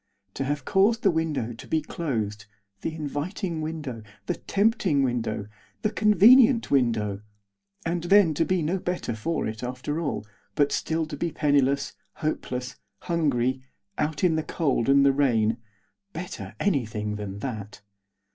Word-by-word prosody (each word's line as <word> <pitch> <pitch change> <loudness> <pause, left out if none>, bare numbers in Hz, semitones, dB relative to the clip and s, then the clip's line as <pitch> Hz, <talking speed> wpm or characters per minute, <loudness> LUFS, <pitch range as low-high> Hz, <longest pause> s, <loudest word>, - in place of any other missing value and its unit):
To - - -3
have 145 -1 -2
caused 210 +4 +3
the 195 - +5
window 155 -8 -1
to 115 - -11
be 160 - +1
closed 110 -10 -3 0.3
the 160 - -3
inviting 160 +3 -3
window, 155 -7 -5 0.2
the 175 - 0
tempting 195 - +1
window, 115 -5 -1 0.4
the 215 - +1
convenient 225 +4 +6
window! 110 -7 +1 0.6
and 170 +1 -1
then 190 -3 +5
to 160 - +1
be 185 -1 0
no 175 +5 0
better 175 -10 -3
for 155 +9 -2
it 110 0 -4
after 130 +5 -3
all, 140 -9 -2 0.3
but 145 -1 +3
still 160 0 0
to 155 - -6
be 170 +3 -2
penniless, 140 -2 +2 0.2
hopeless, 125 -5 -3 0.2
hungry, 130 -7 0 0.4
out 150 +1 -1
in 180 -3 +4
the - - +1
cold 140 -7 0
and 140 0 +6
the 140 - +5
rain 115 -5 +2 0.6
better 180 +3 -7
anything 110 - -1
than 100 -2 -5
that. 105 -3 -6
145 Hz, 145 wpm, -26 LUFS, 120-170 Hz, 0.6 s, convenient